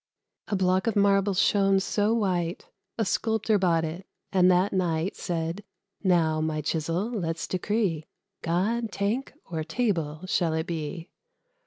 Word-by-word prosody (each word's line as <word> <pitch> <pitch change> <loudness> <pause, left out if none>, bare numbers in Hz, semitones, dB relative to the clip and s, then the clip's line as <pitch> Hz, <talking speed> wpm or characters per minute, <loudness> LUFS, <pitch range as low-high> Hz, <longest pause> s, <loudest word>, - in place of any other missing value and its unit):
A 205 - -1
Block 185 +2 +2
of 230 - +1
marble 200 -1 +3
shone 195 +1 +3
so 205 +2 +1
white, 185 -6 0 0.3
A 225 - +1
Sculptor 220 +1 +1
bought 165 -3 +2
it, 170 +4 -6 0.2
and, 185 -1 +5
that 185 +2 +3
night, 175 -1 0
Said, 170 +2 -3 0.4
"Now, 165 -4 +3
my 155 -1 -1
chisel, 165 - -1
let's 165 -7 -2
decree: 185 -4 -1 0.3
God, 215 +7 0
tank, 210 +8 -1
or 160 -3 -4
table, 165 -4 -1
shall 175 -3 +1
it 160 0 -1
be? 165 0 -5
185 Hz, 140 wpm, -27 LUFS, 165-205 Hz, 0.4 s, and